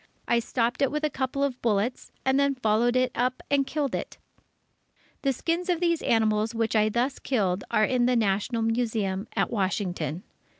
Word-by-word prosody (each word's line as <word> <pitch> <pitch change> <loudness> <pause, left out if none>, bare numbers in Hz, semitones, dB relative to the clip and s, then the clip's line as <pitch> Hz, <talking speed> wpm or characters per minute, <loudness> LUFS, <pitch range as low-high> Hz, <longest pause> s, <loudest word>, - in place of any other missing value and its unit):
I 235 - +3
stopped 240 +1 -1
it 275 - +4
with 300 +1 -3
a 305 - +1
couple 265 +1 -2
of 270 -3 -2
bullets, 225 +2 -1
and 265 +1 +3
then 280 -1 +2
followed 240 0 +2
it 255 0 +2
up 250 +2 -1
and 275 -1 +3
killed 290 -4 -2
it. - - -4 1.0
The 275 - +2
skins 335 +7 -2
of 355 - +4
all - - -8
these 335 -2 +2
animals 220 0 +1
which 225 0 0
I 215 0 +4
thus 245 +5 -1
killed 195 -7 0
are 215 -2 +3
in 245 +1 +2
the 250 - +2
National 225 +2 +1
Museum 225 -4 -1
at - - +1
Washington. 185 - -2
240 Hz, 185 wpm, -26 LUFS, 215-265 Hz, 1.0 s, it